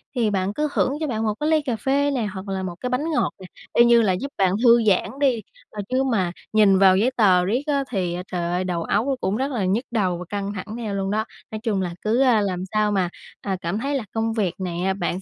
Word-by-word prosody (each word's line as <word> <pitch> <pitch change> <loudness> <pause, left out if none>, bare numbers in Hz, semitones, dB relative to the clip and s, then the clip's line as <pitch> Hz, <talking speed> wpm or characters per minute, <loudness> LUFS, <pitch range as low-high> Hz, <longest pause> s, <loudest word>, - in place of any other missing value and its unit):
thì 230 -3 +2
bạn 195 0 -1
cứ 300 +5 0
hưởng - - +2
cho 310 - -2
bạn 225 -4 -2
một 215 -1 +1
cái 300 +1 0
ly 315 -1 +3
cà 255 -5 -2
phê 280 +5 +1
nè 250 -5 -1
hoặc 190 +1 -7
là 190 -1 -3
một 180 -2 -5
cái 250 - -3
bánh 290 +6 -1
ngọt 300 - 0
nè, 190 - -10 0.3
y 235 - +6
như 235 -1 +6
là 200 -4 +2
giúp 275 +10 -4
bạn 190 -1 +3
thư 235 -1 +6
giãn 200 -4 +2
đi 260 -6 +2 0.3
mà 210 - -8
chứ 260 +1 +1
mà 195 -9 0 0.2
nhìn 200 -3 +5
vào 190 -1 +6
giấy 235 +6 +2
tờ 185 -5 +4
riết 235 +8 0
á, 280 -2 +1
thì, 185 -6 -1
a, 180 +1 -4
trời 175 -1 -2
ơi, 180 +1 0
đầu 175 -2 -2
óc 230 - 0
nó 275 - +1
cũng 195 +3 0
rất 270 +2 -1
là 220 -8 -1
nhức 215 +8 0
đầu 190 -7 0
và 180 - -7
căng 200 0 -3
thẳng 210 +2 -6
theo 215 -4 -4
luôn 195 0 -2
đó. 215 +1 0 0.3
Nói 215 - -4
chung 210 -5 0
là 175 -2 -3
cứ, 225 +5 +1
a, 245 -5 +4
làm 185 -3 -2
sao 215 -1 +2
mà, 185 -4 +1 0.3
à, 195 -2 -2
cảm 175 +5 -2
thấy 280 +4 -2
là 265 - -1
công 225 0 -1
việc 200 -6 0
này, 175 -2 -3
a, 190 +1 +1
bạn 185 0 -3
210 Hz, 280 wpm, -23 LUFS, 190-245 Hz, 0.3 s, y